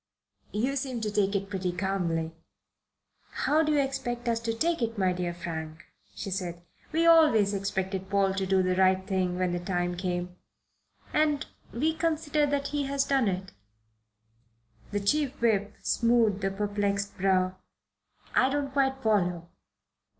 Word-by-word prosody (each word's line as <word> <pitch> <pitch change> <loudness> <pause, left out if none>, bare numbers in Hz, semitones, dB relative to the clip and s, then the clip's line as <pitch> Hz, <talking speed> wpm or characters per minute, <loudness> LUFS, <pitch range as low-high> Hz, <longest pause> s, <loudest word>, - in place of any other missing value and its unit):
"You 250 +6 0
seem 260 -3 -3
to 215 -1 -2
take 205 -1 +1
it 195 0 -1
pretty 190 -2 -2
calmly." 175 -3 -1 1.1
"How 310 +2 +4
do 305 -1 +1
you 295 - +3
expect 260 -3 -2
us 230 -1 +1
to 230 0 -2
take 330 +8 0
it, 230 -1 -1
my 185 -2 +2
dear 180 -1 -2
Frank?" 160 -2 -6 0.3
she 195 - -5
asked. 180 -2 -3 0.3
"We 325 +2 +2
always 300 -12 +6
expected 190 -1 -2
Paul 195 -1 +2
to 195 0 -2
do 190 0 +3
the 185 0 +1
right 190 0 +3
thing 185 -2 0
when 185 -1 0
the 175 - -1
time 175 -1 -1
came, 180 0 -3 0.8
and 300 -2 +2 0.3
we 310 +7 0
consider 315 -2 +1
that 280 0 -1
he 290 -1 -1
has 275 0 +1
done 270 -5 +2
it." 190 0 -2 1.4
The 205 0 -2
Chief 285 +6 0
Whip 205 -4 +1
smoothed 230 -4 +2
a - - +2
perplexed 200 0 -1
brow. 185 -1 +2 0.8
"I 260 - +4
don't 280 0 -1
quite 265 -1 +1
follow. 180 -6 +1
200 Hz, 155 wpm, -28 LUFS, 185-270 Hz, 1.4 s, always